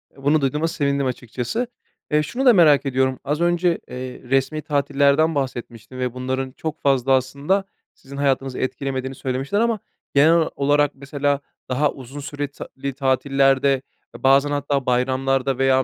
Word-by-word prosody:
E, 135 Hz, -, -16 dB
bunu 150 Hz, +2 st, +3 dB
duyduğuma 150 Hz, +4 st, 0 dB
sevindim 140 Hz, -3 st, 0 dB
açıkçası. 125 Hz, -, -3 dB, 0.4 s
Eee, 150 Hz, 0 st, +3 dB
şunu 245 Hz, -, -3 dB
da 250 Hz, -, +8 dB
merak 155 Hz, -7 st, +5 dB
ediyorum, 130 Hz, -1 st, 0 dB
az 150 Hz, +3 st, -2 dB
önce, 175 Hz, 0 st, +2 dB
eee, 125 Hz, 0 st, -7 dB
resmi 135 Hz, +4 st, 0 dB
tatillerden 145 Hz, +2 st, +2 dB
bahsetmiştin 130 Hz, -3 st, -5 dB
ve 125 Hz, -2 st, -1 dB
bunların 130 Hz, +1 st, -3 dB
çok 155 Hz, +3 st, -6 dB
fazla 135 Hz, -2 st, +2 dB
aslında 140 Hz, +9 st, +1 dB, 0.3 s
sizin 140 Hz, +1 st, -12 dB
hayatınızı 135 Hz, -2 st, 0 dB
etkilemediğini 130 Hz, 0 st, -3 dB
söylemiştin 135 Hz, +8 st, -2 dB
ama 230 Hz, 0 st, +1 dB, 0.4 s
genel 160 Hz, +3 st, +5 dB
olarak 145 Hz, +1 st, +2 dB
mesela 140 Hz, +1 st, -1 dB, 0.3 s
daha 140 Hz, +3 st, +1 dB
uzun 135 Hz, +2 st, -10 dB
süre 145 Hz, 0 st, -4 dB
ta 140 Hz, -, -10 dB, 0.2 s
li 140 Hz, 0 st, -1 dB
tatillerde, 135 Hz, 0 st, +2 dB, 0.4 s
bazen 135 Hz, +3 st, +4 dB
hatta 145 Hz, -2 st, -1 dB
bayramlarda 130 Hz, +1 st, +1 dB
veya 135 Hz, 0 st, +3 dB
140 Hz, 150 wpm, -22 LUFS, 130-145 Hz, 0.4 s, da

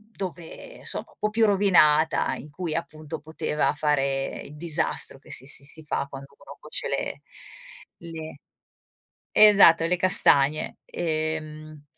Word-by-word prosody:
dove 185 Hz, -, -7 dB
somma -, -, -2 dB
un -, -, -22 dB
po' 210 Hz, -, 0 dB
più 220 Hz, +1 st, +2 dB
rovinata 170 Hz, -6 st, +3 dB
in 150 Hz, -, -10 dB
cui 165 Hz, +2 st, -4 dB
appunto 155 Hz, -2 st, -5 dB
poteva 155 Hz, -1 st, -1 dB
fare 140 Hz, -2 st, -1 dB
il 150 Hz, -, -12 dB
disastro 160 Hz, -3 st, -3 dB
che -, -, -20 dB
si 130 Hz, -, -7 dB
si 140 Hz, 0 st, -10 dB
si 160 Hz, +2 st, -10 dB
fa 140 Hz, -2 st, -2 dB
quando 135 Hz, 0 st, -10 dB
uno -, -, -13 dB
cuoce -, -, -4 dB
le -, -, -3 dB, 0.8 s
le 160 Hz, -3 st, -9 dB, 0.9 s
esatto 195 Hz, -6 st, +7 dB
le 175 Hz, +2 st, +2 dB
castagne 155 Hz, -5 st, +3 dB
ehm, 155 Hz, -2 st, -4 dB
155 Hz, 135 wpm, -25 LUFS, 150-170 Hz, 0.9 s, esatto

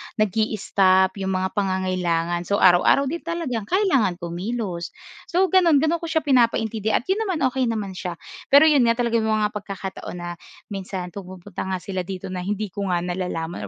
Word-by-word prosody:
nagi-stop 200 Hz, -3 st, +2 dB
yung 190 Hz, -1 st, -1 dB
mga 185 Hz, 0 st, -1 dB
pangangailangan. 180 Hz, -3 st, -1 dB
So 200 Hz, -, +1 dB
araw-araw 190 Hz, -, +5 dB
din 340 Hz, -, -3 dB
talagang 305 Hz, -11 st, -3 dB
kailangan 315 Hz, -, +2 dB
kumilos. 175 Hz, +1 st, -4 dB, 0.3 s
So 360 Hz, +2 st, +2 dB
gano'n 335 Hz, -6 st, +5 dB
gano'n 330 Hz, +1 st, +1 dB
ko 335 Hz, -, -6 dB
siya 320 Hz, -1 st, 0 dB
pinapaintindi 225 Hz, -5 st, +2 dB
at -, -, +1 dB
'yon 435 Hz, +2 st, 0 dB
naman 330 Hz, -7 st, -1 dB
okey 255 Hz, -1 st, 0 dB
naman 215 Hz, -4 st, -2 dB
siya. 180 Hz, -1 st, -5 dB, 0.3 s
Pero 285 Hz, +2 st, +7 dB
'yon 290 Hz, -6 st, +5 dB
nga 230 Hz, -, +3 dB
talaga 235 Hz, -1 st, +1 dB
may 220 Hz, 0 st, +1 dB
mga 210 Hz, -1 st, +1 dB
pagkakataon 195 Hz, -3 st, -6 dB
na, 175 Hz, 0 st, -6 dB, 0.4 s
minsan 190 Hz, -2 st, -5 dB
pumupunta 185 Hz, 0 st, -9 dB
nga 190 Hz, -, -1 dB
sila 185 Hz, -2 st, -4 dB
dito 190 Hz, 0 st, -6 dB
na 185 Hz, -, -4 dB
hindi 205 Hz, +1 st, -3 dB
ko 200 Hz, +1 st, -4 dB
nga 175 Hz, -1 st, 0 dB
nalalaman 175 Hz, -, -4 dB
200 Hz, 175 wpm, -23 LUFS, 185-245 Hz, 0.4 s, Pero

